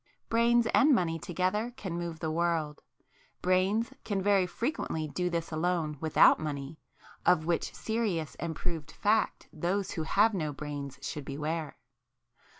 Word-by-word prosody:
Brains 235 +1 +4
and 280 0 +6
money 165 -5 0
together 185 +8 -1
can 190 -8 -4
move 170 -2 -4
the 160 - -1
world,—brains 180 - -1
can 205 -3 -1
very 195 -1 +3
frequently 180 - -2
do 180 +4 -1
this 170 -1 -2
alone 160 -2 0
without 160 -1 +6
money, 145 0 -5 0.4
of 155 -3 +4
which 170 0 -1
serious 210 -9 -1
and 165 0 -3
proved 160 -3 -4
fact 215 +2 +1
those 180 +5 -1
who 160 - -3
have 210 +7 +3
no 155 -6 -2
brains 140 -2 -6
should 145 0 -4
beware! 150 +3 -3
170 Hz, 140 wpm, -30 LUFS, 155-200 Hz, 0.4 s, and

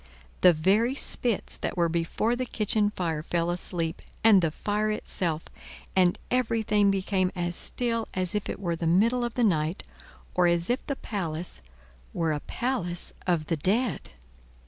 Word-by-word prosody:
The 180 - +8
very 200 - +2
spits 240 -6 -1
that - - -4
were 170 -1 +3
before 170 +8 0
the 255 0 -3
kitchen 210 -2 +1
fire 165 -6 -2
fell 170 +1 0
asleep, 170 -2 -3 0.2
and 215 -4 +7
the 165 - +2
fire 210 +6 -1
itself, 170 -6 -2 0.5
and 180 -2 +4
everything 220 -4 +2
became 190 -1 +1
as 175 -1 -2
still 230 +1 -1
as 185 +1 -1
if 210 -1 -2
it - - -4
were 170 -4 -1
the 165 0 -2
middle 230 +9 +3
of 240 -1 -3
the 245 - +2
night, 165 -3 +1 0.5
or 180 -1 +4
as 170 +3 +2
if 250 - -1
the 280 - -1
palace 175 - -4 0.5
were 165 -2 +1
a 150 - -2
palace 190 - -3
of 170 -4 +1
the 165 - -1
dead. 210 - 0
185 Hz, 165 wpm, -27 LUFS, 170-220 Hz, 0.5 s, The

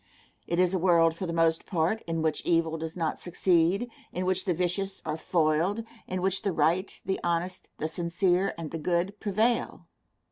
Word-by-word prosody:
It 170 - -1
is 180 0 +3
a 185 - +1
world, 165 -2 +4
for 185 +2 -4
the - - -2
most 165 -1 +2
part, 180 +5 0
in 165 -1 -1
which 155 -1 0
evil 165 -1 +2
does 160 +2 -5
not 165 -2 -1
succeed, 180 +4 +2 0.2
in 180 +1 -3
which 185 0 0
the 180 - +2
vicious 190 +3 -2
are 155 - -1
foiled, 170 +5 +1 0.2
in 185 0 -3
which 190 0 +1
the 200 - 0
right, 165 +5 +2
the 190 - -1
honest, 175 +2 -2
the 155 - -2
sincere, 175 +3 +1
and 165 -2 -6
the 165 - -4
good 180 +5 -1
prevail. 220 +4 0
175 Hz, 185 wpm, -28 LUFS, 165-190 Hz, 0.2 s, world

